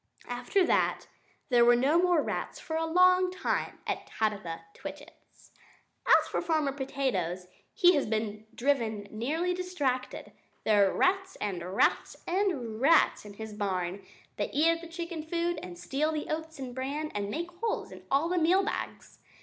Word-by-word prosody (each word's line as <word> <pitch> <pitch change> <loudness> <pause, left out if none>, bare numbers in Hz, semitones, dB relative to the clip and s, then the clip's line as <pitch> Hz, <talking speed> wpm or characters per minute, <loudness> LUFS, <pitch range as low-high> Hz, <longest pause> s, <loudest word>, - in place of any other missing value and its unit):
After 245 +10 +1
that, - - +1 0.4
there 240 -2 +5
were 240 0 +6
no 285 +8 +3
more 355 -4 +3
rats - - -4
for 320 - -5
a 325 0 0
long 365 +2 +5
time 365 - -2
at - - -3
Tabitha 200 -7 -2
Twitchit's. - - -12 0.6
As - - +6
for - - 0
Farmer 310 -4 +1
Potatoes, 260 -11 -2 0.3
he 355 0 +5
has 285 - +1
been 215 0 -3
driven 230 -6 0
nearly 310 +11 -1
distracted. 305 -9 -2 0.3
There 205 -2 +4
are - - -4
rats, 380 0 +2
and 185 -2 -4
rats, - - +2
and 325 - -1
rats 310 -5 +4
in 205 -1 -10
his 220 0 -7
barn! 190 -2 -2 0.3
They - - -1
eat 315 +3 +3
up 330 0 -2
the 335 - -8
chicken 335 0 -5
food, 340 +2 -1
and 180 -1 -8
steal 280 - -1
the 305 -1 -4
oats 320 0 -4
and 260 -2 -6
bran, 280 +4 -3
and 205 -1 -2
make 340 +9 -4
holes 455 -1 -2
in - - -10
the 330 +6 +2
meal 360 +4 +4
bags. 415 - -5
280 Hz, 165 wpm, -29 LUFS, 215-335 Hz, 0.6 s, were